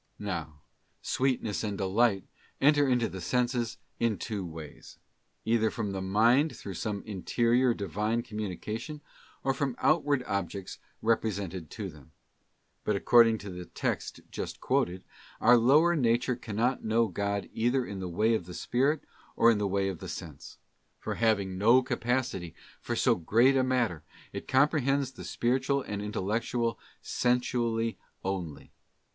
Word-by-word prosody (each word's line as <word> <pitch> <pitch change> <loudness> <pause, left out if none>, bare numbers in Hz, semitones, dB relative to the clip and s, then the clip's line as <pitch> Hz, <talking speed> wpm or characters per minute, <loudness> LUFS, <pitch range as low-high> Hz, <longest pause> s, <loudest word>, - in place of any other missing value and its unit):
'* - - -44
Now, 80 -7 -5 0.4
sweetness 125 -6 0
and 105 -2 -2
delight 100 +1 +2 0.3
enter 145 0 +4
into 125 -2 +2
the 95 - -7
senses 120 +2 0 0.2
in 115 -3 +1
two 105 -4 -4
ways: 80 -3 -10 0.5
either 110 -1 +3
from 105 -2 -3
the 95 -1 -3
mind 115 +10 +3
through 100 - -7
some 100 +3 -3
interior 120 +4 +1
Divine 105 +4 -1
com 110 -3 -7
munication, 110 - -5 0.4
or 135 - +2
from 135 -2 -2
outward 145 -3 +2
objects 100 -3 -4 0.2
represented 100 -7 -1
to 105 -3 -5
them. 75 -2 -14 0.7
But 105 - +1
according 115 +2 +5
to 100 - -5
the 90 0 -7
text - - -3
just - - -5
quoted, 90 +1 0 0.4
our 120 +2 +6
lower 150 +9 +5
nature 125 -2 +2
can 115 -4 -7
not 125 +4 +1
know 115 +1 +2
God 100 +1 -2
either 120 +3 +1
in 100 -1 -6
the 90 -1 -4
way 110 +7 +2
of 95 -6 -1
the 90 - -8
spirit 135 - +1 0.3
or 115 - +6
in 110 - +1
the 105 - 0
way 100 0 0
of 95 -4 -4
sense; - - -8 0.4
for - - -4
having 100 -5 +1
no 120 +5 +6
capacity 120 -10 -2 0.3
for - - -3
so - - +4
great 115 +10 +3
a 135 - +4
matter, 120 -10 0 0.3
it - - -6
com 135 +2 +5
prehends 140 -3 0
the - - -9
spiritual 130 +3 0
and 100 -1 -4
intellectual, 115 +3 -1 0.2
sensually 120 -2 0 0.2
only. 90 -6 -4
110 Hz, 150 wpm, -29 LUFS, 95-125 Hz, 0.7 s, our